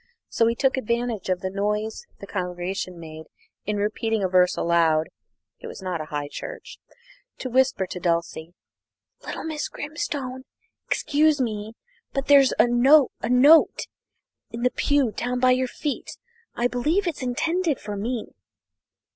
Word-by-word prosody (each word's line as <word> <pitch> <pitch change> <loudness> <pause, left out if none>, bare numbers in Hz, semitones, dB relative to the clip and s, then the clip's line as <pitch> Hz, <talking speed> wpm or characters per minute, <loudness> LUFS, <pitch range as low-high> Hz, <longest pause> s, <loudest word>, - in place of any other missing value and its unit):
So 230 - +2
he 230 - +1
took 265 +2 +1
advantage 235 -4 -2
of 185 -1 0
the 190 -1 -3
noise 210 +2 -2
the - - -8
congregation 180 -1 -4
made 160 -1 -9 0.4
in 210 0 -1
repeating 215 +1 -1
a - - +2
verse 180 -1 +3
aloud 165 -2 +2 0.5
(it - - -9
was - - -9
not 185 -4 -3
a - - -5
high 145 -1 -4
church) - - -8 0.6
to 255 - -5
whisper 260 -6 +2
to 180 - -7
Dulcie: 170 -1 -2 0.7
"Little - - -6
Miss 315 -2 -3
Grimstone, 280 -4 -5 0.4
excuse 305 0 +2
me, 220 -3 -3 0.4
but 275 -1 -1
there's 275 -2 +6
a - - +6
a 255 +4 +4
note 280 +6 +5 0.6
in 235 +1 -6
the 250 - +3
pew 285 -5 +1
down 245 +3 -2
by 255 0 +4
your 255 0 +2
feet. 290 +3 -5 0.4
I 240 - +1
believe 300 +11 0
it's 340 -5 -3
intended 325 +5 0
for 210 -1 -6
me." 225 +3 -3
235 Hz, 150 wpm, -24 LUFS, 185-265 Hz, 0.7 s, there's